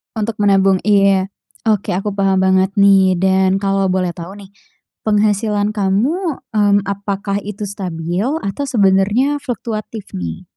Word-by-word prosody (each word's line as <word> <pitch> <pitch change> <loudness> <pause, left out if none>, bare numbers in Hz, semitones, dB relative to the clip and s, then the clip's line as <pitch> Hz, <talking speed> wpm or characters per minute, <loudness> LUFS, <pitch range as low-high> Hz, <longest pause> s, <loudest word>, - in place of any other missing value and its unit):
Untuk 220 0 -2
menabung? 195 -1 +3
Iya. 195 -2 +3 0.3
Oke, 215 -5 0
aku 200 +2 -2
paham 195 -1 +1
banget 190 +1 +2
nih 195 -2 +5
dan 190 0 +2
kalau 195 0 +1
boleh 185 -1 0
tahu 170 +3 -9
nih, 200 -2 -12 0.6
penghasilan 210 0 +1
kamu, 245 - -1
mmm, 205 -2 +3
apakah 200 0 -3
itu 210 +1 -7
stabil 180 -1 -3 0.2
atau 240 +9 -3
sebenarnya 210 +6 +2
fluktuatif 225 -5 -6
nih? 85 -2 -5
200 Hz, 130 wpm, -17 LUFS, 190-210 Hz, 0.6 s, nih